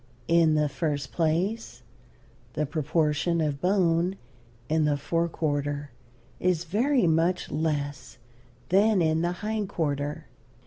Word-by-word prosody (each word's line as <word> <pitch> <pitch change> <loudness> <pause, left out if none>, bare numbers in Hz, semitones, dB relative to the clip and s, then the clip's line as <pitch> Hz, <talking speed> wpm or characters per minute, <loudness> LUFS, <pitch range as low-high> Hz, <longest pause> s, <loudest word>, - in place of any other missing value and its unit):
In 165 -2 +4
the 150 -1 +2
first 145 -3 -3
place 165 - -1 0.7
the 150 - 0
proportion 155 +2 0
of 150 -3 -1
bone 180 -1 +2 0.5
in 155 +1 +2
the 145 -1 +2
fore 165 +4 -1
quarter 145 -2 -2 0.5
is 180 -2 +1
very 235 - +2
much 165 +2 +1
less 145 -4 -2 0.5
than 200 +2 +4
in 160 0 +2
the 175 +1 0
hind 215 -2 -2
quarter. 145 -5 -2
160 Hz, 120 wpm, -27 LUFS, 145-180 Hz, 0.7 s, In